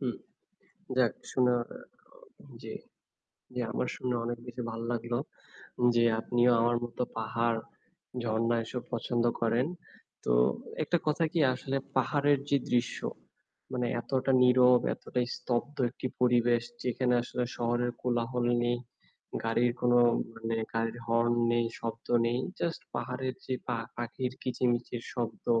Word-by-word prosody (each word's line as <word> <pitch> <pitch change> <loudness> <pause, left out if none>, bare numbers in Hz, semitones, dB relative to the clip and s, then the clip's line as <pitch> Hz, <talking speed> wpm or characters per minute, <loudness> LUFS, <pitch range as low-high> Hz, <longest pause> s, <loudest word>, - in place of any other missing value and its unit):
হুম, 125 -4 -2 0.8
যাক 125 -3 +4 0.2
শোনা 125 -1 +3 0.2
এ - - -10 0.3
অ - - -20 0.2
জী - - -6 0.8
জি 125 - -3
আমার 125 - -1
শুনে 125 -1 -1
অনেক 120 0 -2
বেশি 125 +1 -6
ভাল 115 0 -5
লাগলো। 120 0 -1 0.8
যে 120 0 +4 0.2
আপনিও 120 +2 +3
আমার 120 +1 +3
মত 120 - -8 0.2
পাহাড়, 115 +1 0 0.6
ঝরণা 115 +1 +1
এসব 125 +2 -5
পছন্দ 120 +1 0 0.2
করেন। 115 +3 +2 0.6
তো - - +2 0.5
একটা 175 - +2
কথা 155 +2 +2
কি 170 - +1 0.2
আসলে 135 +1 -3 0.2
পাহাড়ের 145 +2 +3
যে 140 - +5
দৃশ্য 120 0 +1 0.7
মানে 125 -1 0
এতটা 130 +2 0
নীরব, 125 0 +7
এতটাই 125 -1 -2
স্তব্ধ 130 +4 -2
একটি 130 - -5
পরিবেশ। 120 -1 +4 0.2
যেখানে 125 0 +1
আসলে 125 +1 -2
শহরের 120 +1 +1
কোলাহল 120 0 0 0.2
নেই, 120 0 +1 0.7
গাড়ির 120 +2 +2
কোনো 120 0 +4 0.4
মানে 115 0 -2 0.2
গাড়ির 115 +1 -1
হর্ন 115 +1 +3 0.2
নেই, 120 0 +2
শব্দ 115 0 -5 0.2
নেই। 120 +1 +1 0.2
জাস্ট 170 -1 -1
পাহাড়ের 130 0 -2
যে 130 - -1
পা 120 - +1 0.2
পাখির 120 +2 -3
কিচমিচির 120 -1 0
শব্দ। 120 -3 -4
120 Hz, 135 wpm, -30 LUFS, 115-125 Hz, 0.8 s, নীরব